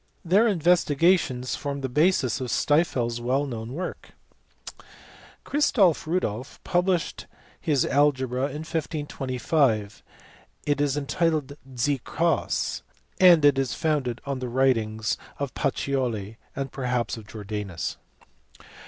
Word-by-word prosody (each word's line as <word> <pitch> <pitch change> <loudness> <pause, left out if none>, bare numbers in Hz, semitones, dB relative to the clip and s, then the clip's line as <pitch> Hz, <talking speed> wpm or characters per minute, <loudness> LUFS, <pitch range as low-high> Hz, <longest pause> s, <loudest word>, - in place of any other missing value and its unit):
Their 200 +7 +4
investigations 165 - +2
form 140 -1 -4
the 135 - -1
basis 145 -2 +2
of 130 - -2
Stifel 145 +1 +2
s 120 - -4
well 130 +4 0
known 115 -2 -6
work. 180 +5 -6 1.3
Christoff 215 - +3
Rudolff* 130 - -2
published 180 -1 0 0.3
his 150 -6 +1
algebra 130 -3 +2
in 150 +2 -6
1525; 140 -7 -1 0.6
it 145 -1 +1
is 145 -1 +1
entitled 145 -1 0 0.2
Die 130 +3 0
Coss, 165 -2 0 0.4
and 175 -5 +7
is 135 -3 +3
founded 140 -6 -1
on 140 -2 -3
the 125 -1 -4
writings 115 -4 +1 0.2
of 140 -2 -4
Pacioli 115 -6 -2 0.2
and 135 -2 -4
perhaps 125 -3 -1
of 110 -2 -11
Jordanus. 105 -5 -5
140 Hz, 110 wpm, -25 LUFS, 125-160 Hz, 1.3 s, and